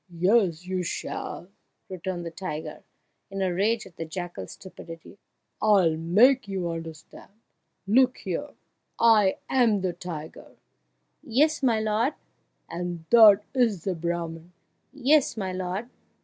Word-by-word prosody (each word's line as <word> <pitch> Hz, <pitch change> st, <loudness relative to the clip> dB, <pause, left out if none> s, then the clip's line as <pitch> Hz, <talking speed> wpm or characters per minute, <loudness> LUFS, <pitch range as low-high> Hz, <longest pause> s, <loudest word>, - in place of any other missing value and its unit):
"Yes, 180 Hz, -2 st, +2 dB
you 185 Hz, 0 st, -2 dB
shall!" 175 Hz, 0 st, -5 dB, 0.4 s
returned 185 Hz, -1 st, -5 dB
the 170 Hz, -, -5 dB
tiger, 160 Hz, -3 st, -6 dB, 0.5 s
in 195 Hz, 0 st, -3 dB
a 185 Hz, -2 st, 0 dB
rage 215 Hz, +5 st, 0 dB
at 185 Hz, -3 st, -16 dB
the -, -, -4 dB
jackal's 175 Hz, +2 st, -7 dB
stupidity; 170 Hz, 0 st, -12 dB, 0.4 s
"I'll 195 Hz, -7 st, +4 dB
make 220 Hz, +11 st, +4 dB
you 190 Hz, -3 st, -3 dB
understand! 165 Hz, +1 st, -9 dB, 0.5 s
Look 250 Hz, +5 st, +3 dB
here -, -, -5 dB, 0.4 s
I 215 Hz, -4 st, +4 dB
am 230 Hz, -6 st, +2 dB
the 185 Hz, -1 st, -1 dB
tiger 165 Hz, -3 st, -8 dB, 0.4 s
" -, -, -48 dB, 0.2 s
"Yes, 300 Hz, +7 st, +1 dB
my 235 Hz, -5 st, +2 dB
lord!" 220 Hz, +6 st, 0 dB, 0.5 s
"And 175 Hz, -1 st, -5 dB
that 215 Hz, -3 st, +8 dB
is 230 Hz, -, +1 dB
the 190 Hz, -, -1 dB
Brahman 170 Hz, 0 st, -4 dB, 0.3 s
" -, -, -47 dB
"Yes, 280 Hz, -1 st, +2 dB
my 190 Hz, -3 st, -3 dB
lord!" 185 Hz, +4 st, -4 dB
190 Hz, 135 wpm, -26 LUFS, 170-220 Hz, 0.5 s, that